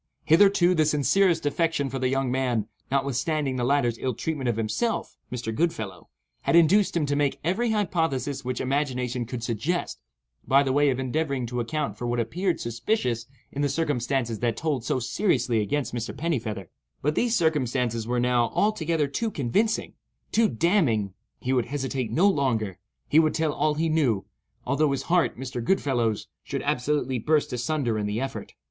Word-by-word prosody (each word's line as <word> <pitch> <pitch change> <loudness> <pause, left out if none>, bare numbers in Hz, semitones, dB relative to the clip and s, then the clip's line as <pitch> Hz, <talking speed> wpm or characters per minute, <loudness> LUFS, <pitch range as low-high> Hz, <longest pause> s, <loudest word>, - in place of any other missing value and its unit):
Hitherto, 180 +1 +5
the 160 -3 +3
sincerest 155 +4 +2
affection 160 -1 +1
for 135 - -3
the 130 - +1
young 135 -1 0
man 125 -5 0 0.2
(notwithstanding 140 +1 0
the 125 - -1
latter's 120 -3 +1
ill 130 -3 -2
treatment 145 -4 -2
of 120 - 0
himself, 115 - -1 0.2
Mr. 115 -2 -3
Goodfellow) 110 - -2 0.3
had - - +1
induced 175 +3 +5
him 155 - +1
to 145 0 0
make 145 -1 0
every 200 +9 +1
hypothesis 160 - 0
which 125 0 -3
imagination 125 -3 -1
could 125 -2 -5
suggest, 120 - -2 0.5
by 140 +1 +4
way 145 +2 +3
of 130 -1 0
endeavoring 135 0 -1
to 125 +1 -3
account 120 -3 -2
for 120 - -3
what 120 0 0
appeared 175 - -1
suspicious 120 - -1 0.2
in 140 - -3
the 145 - +2
circumstances 135 -6 -1
that 115 -2 0
told 145 -5 -1
so - - 0
seriously 120 - +1
against 140 +6 -2
Mr. 115 -2 -4
Pennifeather, 115 - -3 0.3
but 150 +2 +2
these 235 +6 +1
circumstances 125 - 0
were 120 0 0
now 120 -1 +2
altogether 170 -7 +1
too 220 +11 -2
convincing—too 215 - -1
damning; 120 - +1 0.3
he 130 - -1
would 125 -3 +2
hesitate 135 -3 -2
no 175 - +4
longer—he 115 - 0
would 155 -1 +2
tell 160 -2 +1
all 150 0 +1
he 160 +2 0
knew, 140 -11 +1 0.4
although 140 +3 +2
his 135 - -2
heart 175 0 +1
(Mr. 125 -2 -5
Goodfellow's) 120 - 0 0.2
should - - -4
absolutely 130 -1 0
burst 150 +4 +1
asunder 125 -3 -1
in 105 - -1
the 105 +2 -2
effort. 135 +1 -5
135 Hz, 165 wpm, -26 LUFS, 120-160 Hz, 0.5 s, Hitherto